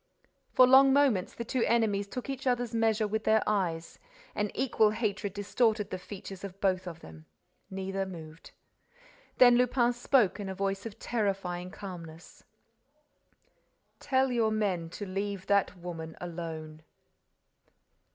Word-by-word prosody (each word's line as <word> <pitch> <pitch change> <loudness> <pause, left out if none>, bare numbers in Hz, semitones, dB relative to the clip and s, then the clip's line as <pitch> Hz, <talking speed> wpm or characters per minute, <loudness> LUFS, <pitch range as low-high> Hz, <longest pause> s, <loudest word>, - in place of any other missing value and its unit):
For 255 - +7
long 265 +1 +7
moments, 270 -10 +2
the 235 - -5
two 255 +2 -1
enemies 210 -4 +1
took 250 +4 -6
each 270 0 -4
other's 245 -2 0
measure 225 -1 +2
with 220 +1 -2
their 220 0 +3
eyes. 170 -6 -1 0.3
An 210 0 -1
equal 230 -5 +3
hatred 210 -2 -2
distorted 210 +1 0
the 185 - -3
features 195 0 -9
of 195 -1 -8
both 185 -2 0
of 165 -2 -8
them. 80 0 -13 0.4
Neither 195 0 -3
moved. 160 -3 -10 0.9
Then 245 -1 +7
Lupin 245 -1 +2
spoke, 240 -4 +2
in 200 -2 -4
a 190 - -5
voice 195 +2 -2
of 215 - -11
terrifying 195 -5 -2
calmness: 175 -4 -10 1.6
"Tell 265 -1 +1
your 230 -3 +2
men 195 -6 -1
to 205 +4 -6
leave 195 0 -4
that 200 -1 +1
woman 165 -2 -7
alone." 160 -3 -6
200 Hz, 140 wpm, -30 LUFS, 180-230 Hz, 1.6 s, For